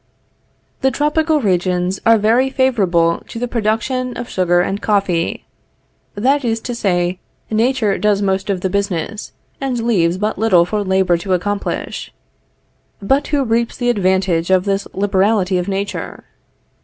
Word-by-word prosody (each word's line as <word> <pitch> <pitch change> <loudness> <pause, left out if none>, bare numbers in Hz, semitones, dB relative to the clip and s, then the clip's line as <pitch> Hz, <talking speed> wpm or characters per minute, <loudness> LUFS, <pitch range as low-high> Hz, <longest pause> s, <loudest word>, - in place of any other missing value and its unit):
The 265 - +3
tropical 300 +2 +1
regions 180 -2 0
are 230 0 +7
very 230 +5 +2
favorable 195 -11 +1
to - - -8
the 245 +1 -2
production 240 +3 -1
of 240 - -5
sugar 175 -1 +2
and 195 +3 -2
coffee; 195 -5 0 0.7
that 265 +7 +1
is 225 -2 0
to 245 - -4
say, 180 -5 0 0.3
Nature 225 -2 +1
does 210 -1 +2
most 195 0 -1
of 190 -2 -1
the 190 - -1
business 200 0 -2 0.3
and 260 -3 -1
leaves 180 -7 +2
but 210 0 -2
little 190 -6 +4
for 205 +3 -2
labor 190 -2 +2
to 185 +2 -2
accomplish. 205 +3 -3 0.9
But 270 +8 +1
who 285 -2 +1
reaps 230 -1 0
the 245 -1 +1
advantage 185 -5 +1
of 185 0 +3
this 195 0 -1
liberality 195 -1 +1
of 180 - -3
Nature? 200 +1 -4
200 Hz, 145 wpm, -18 LUFS, 185-235 Hz, 0.9 s, are